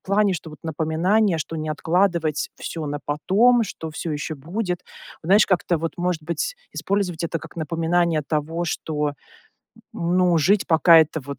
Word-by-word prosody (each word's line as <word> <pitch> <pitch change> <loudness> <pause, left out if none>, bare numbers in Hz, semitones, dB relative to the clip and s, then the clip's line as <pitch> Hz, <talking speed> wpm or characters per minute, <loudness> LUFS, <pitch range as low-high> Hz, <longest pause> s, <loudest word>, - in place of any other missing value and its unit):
плане, 200 0 +2
что 165 -2 -6
вот 150 - -13
напоминание, 165 +5 +1
что 160 +1 -4
не 155 0 -4
откладывать 165 0 0
всё 160 -3 -6
на 145 0 -4
потом, 220 +11 +3
что 160 -5 -7
всё 160 0 -4
еще 150 +1 -4
будет. 180 +5 -3 0.5
Вот - - -7
знаешь, 205 +2 +6
как-то 180 -2 +1
вот, 165 +1 -3
может 175 -3 -1
быть, 170 - -3 0.2
использовать 185 -4 -2
это 165 0 -2
как 160 +1 -13
напоминание 165 0 0
того, 155 +3 -2
что, 150 -3 -2 0.8
ну, 175 0 +2
жить, 195 +7 +2
пока 165 0 +6
это 160 0 +2
вот 140 -1 -7
165 Hz, 165 wpm, -23 LUFS, 155-180 Hz, 0.8 s, знаешь